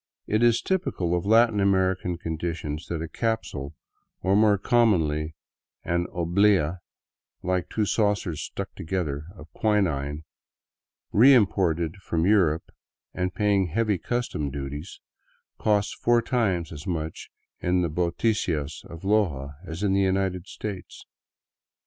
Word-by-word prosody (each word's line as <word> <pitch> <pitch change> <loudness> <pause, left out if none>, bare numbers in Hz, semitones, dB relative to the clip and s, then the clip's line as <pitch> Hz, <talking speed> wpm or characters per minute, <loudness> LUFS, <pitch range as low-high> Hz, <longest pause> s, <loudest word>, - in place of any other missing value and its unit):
It 110 +1 +1
is 120 -1 +4
typical 170 - -1
of 90 +2 -2
Latin 115 -1 +5
American 95 -2 +1
conditions 80 -2 -4
that 80 -2 -3
a - - -4
capsule 95 - -3 0.2
— - - -48
or 95 +2 +3
more 105 -1 +5
com 120 +3 +3
monly 75 -2 -1 0.5
an 85 +1 0
oblea, 90 -1 +2 0.6
like 90 -1 -1
two 110 - 0
saucers 100 -7 0
stuck - - -6
together 80 -4 -3
— 90 - -16
of 75 0 -13
quinine, 80 -9 0 0.9
reim 125 0 +7
ported 85 -2 -1
from 85 -4 -1
Europe 90 -6 +2 0.4
and 90 0 -2
paying 100 -3 +2
heavy 105 +2 0
custom 120 -10 -2
duties, 70 +5 -6 0.6
costs 105 -1 +1
four 120 -1 +2
times 100 -9 0
as 75 -2 -8
much 80 -3 -4 0.3
in 90 0 +1
the - - +1
boticas 85 -2 -1
of 85 0 -11
Loja 85 -10 +1
as 80 +5 -5
in 100 -2 +2
the 100 - +3
United 95 -1 0
States. 100 -4 -7
90 Hz, 135 wpm, -26 LUFS, 80-105 Hz, 0.9 s, reim